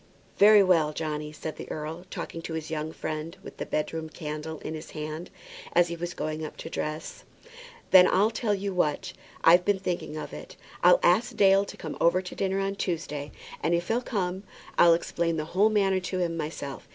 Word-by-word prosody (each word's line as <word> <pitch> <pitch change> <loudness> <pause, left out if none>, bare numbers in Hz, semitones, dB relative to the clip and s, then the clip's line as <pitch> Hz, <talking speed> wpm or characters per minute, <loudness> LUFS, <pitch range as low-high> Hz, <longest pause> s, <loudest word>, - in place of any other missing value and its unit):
"Very 210 0 +8
well, 165 -5 +3
Johnny," 150 -1 -3
said 155 +1 -7
the - - -8
earl, 160 +4 -6
talking 165 - -6
to 165 -1 -5
his 160 0 -5
young 155 0 -3
friend 155 +3 -5
with - - -10
the - - -5
bedroom 160 +1 -2
candle 155 0 -6
in 155 - -5
his 155 0 -7
hand, 155 +3 -5 0.4
as 175 0 +4
he 170 - -3
was 175 +1 -5
going 155 0 -3
up 155 - -7
to 165 - -8
dress. 155 +1 -4 0.7
"Then 185 -1 +9
I'll 205 +4 +3
tell 225 -2 0
you 195 0 -3
what; 155 -5 0 0.3
I've 175 +2 +7
been 205 +1 +2
thinking 180 -4 -3
of - - -6
it. - - -9 0.3
I'll - - +7
ask 235 - +3
Dale 195 0 +5
to - - -10
come - - -6
over 170 +2 +4
to 185 -1 -7
dinner 195 0 -1
on 195 0 -2
Tuesday; 150 -6 -3 0.3
and 170 - +2
if 170 0 -2
he'll 235 +2 +1
come, 190 -6 -2 0.3
I'll 170 -1 +7
explain 165 0 -1
the 155 - -2
whole 205 +4 +5
matter 195 -3 +2
to 185 0 -4
him 175 -2 -1
myself. 150 -3 -5
170 Hz, 200 wpm, -27 LUFS, 155-190 Hz, 0.7 s, Then